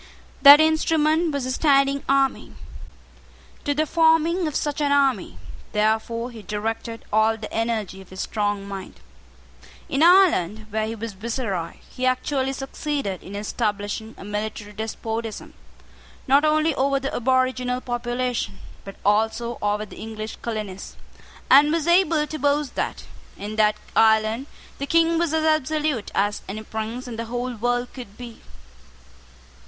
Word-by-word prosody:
That 285 +1 +11
instrument 315 +1 +2
was 280 -3 -2
a 255 - -2
standing 275 0 +3
army. 275 -1 +1 1.1
To 290 -1 0
the 310 +2 +1
forming 325 +2 +3
of 300 - -4
such 295 0 -1
an 285 -1 +1
army, 280 -2 +1 0.4
therefore, 220 +3 0
he 225 -2 -10
directed 225 +3 -4
all 220 +1 +3
the 215 - -8
energy 220 -4 -2
of 190 - -16
his 190 0 -6
strong 205 -2 -2
mind. 195 -1 -8 0.9
In 275 - -1
Ireland, 325 - +4
where 215 +1 -1
he 225 - -4
was 225 -1 -6
viceroy, 200 -5 -3
he 255 0 -2
actually 265 +1 0
succeeded 270 -6 -3
in 195 - -9
establishing 210 +1 -3
a - - -10
military 210 0 -5
despotism, 220 +1 -5 0.7
not 275 +3 +5
only 310 +1 +3
over 275 +1 +1
the 275 0 -4
aboriginal 255 0 +1
population, 240 - -3 0.3
but 195 - -9
also 220 +3 +1
over 210 +1 0
the - - -13
English 220 0 -6
colonists, 210 -4 -5 0.5
and 290 +3 +7
was 325 -2 0
able 335 -3 +3
to 310 0 -6
boast 285 0 +1
that, - - -3 0.3
in 210 +2 -6
that 210 -1 +4 0.2
island, 220 +3 +3 0.3
the 280 - -3
King 330 +1 +3
was 340 -2 +1
as 315 0 +1
absolute 310 -5 0
as 205 +1 0
any 215 +2 -5
prince 220 +4 -5
in 235 -2 -6
the 230 - -3
whole 245 +2 -3
world 245 +2 -1
could 240 -6 -10
be. 240 -2 -10
240 Hz, 145 wpm, -23 LUFS, 215-285 Hz, 1.1 s, That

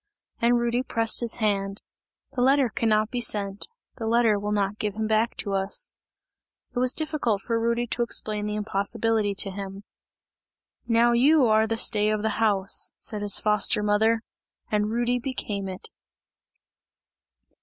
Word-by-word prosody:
And 240 +1 +3
Rudy 240 +1 0
pressed 230 -3 +1
his 235 -1 +2
hand, 200 -3 -2 0.5
"the 260 -3 -3
letter 270 0 +3
cannot 215 0 0
be 245 - -2
sent, 200 -3 -1 0.3
the 225 - -4
letter 225 -2 +3
will 205 +1 -3
not 205 0 -1
give 210 -2 -3
him 220 0 -2
back 220 +2 0
to 200 - -3
us!" 195 - -2 0.8
It - - 0
was 255 0 +3
difficult 300 -10 -2
for 230 -1 -1
Rudy 235 +1 0
to 240 +1 -2
explain 215 -3 0
the 210 - -3
impossibility 210 0 -1
to 195 0 -1
him. 195 0 -7 1.0
"Now 235 0 +3
you 270 +4 +4
are 220 -1 +3
the 225 0 -2
stay 210 -3 +3
of 215 -1 -1
the 220 0 -2
house!" 200 -3 +1
said 210 -2 0
his 205 -1 +4
foster 210 0 +1
mother, 220 +2 +2 0.5
and 210 0 +1
Rudy 240 +2 0
became 210 -6 -4
it. 185 0 -9
220 Hz, 155 wpm, -25 LUFS, 205-235 Hz, 1.0 s, you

